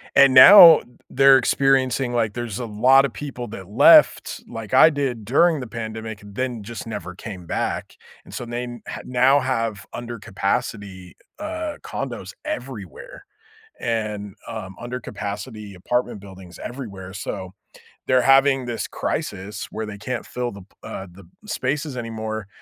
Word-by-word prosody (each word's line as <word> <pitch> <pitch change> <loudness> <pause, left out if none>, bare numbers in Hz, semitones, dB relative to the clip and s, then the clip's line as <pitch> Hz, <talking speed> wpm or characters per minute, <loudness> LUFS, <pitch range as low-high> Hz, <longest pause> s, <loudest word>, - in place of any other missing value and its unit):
and 140 -1 +7
now 165 +5 +10
th - - -17 0.3
they're 135 0 +7
experiencing, 130 -1 +1
like 115 -3 0
there's 120 -3 -5
a 125 - -4
lot 125 +6 +4
of 135 - -5
people 130 -4 -7
that 95 -3 -9
left 145 - +5
like - - -8
I - - +8
did 135 -7 -3
during 155 +7 +3
the 125 - -6
pandemic, 110 -1 -6
then 115 +2 -4
just 115 +1 -8
never 90 -5 -6
came 95 -2 -9
back. - - -3 0.3
And - - -14
so 125 - -5
they 120 +1 -4
n 120 -2 -8 0.2
now 130 +3 +3
have 115 -5 -2
under-capacity, 100 -5 -4 0.2
uh, 310 -1 -5
condos - - -6
everywhere - - -7 0.5
and, 105 -3 -3
um, 110 -5 -7
under-capacity 105 -3 -6
apartment 120 +4 -2
buildings 95 -2 -13
everywhere. 100 -8 -8
So 95 -2 -6 0.5
they're 130 -1 +4
having 135 0 +4
this 120 -1 -4
crisis 100 +1 -4
where 110 -1 -5
they 100 - -8
can't 120 +3 -5
fill 125 -1 -4
the 100 -1 -11
p 90 - -18 0.2
uh, 95 - -7
the 95 +1 -15 0.2
spaces 140 -4 -3
anymore, 110 -3 -5
120 Hz, 145 wpm, -22 LUFS, 105-130 Hz, 0.5 s, now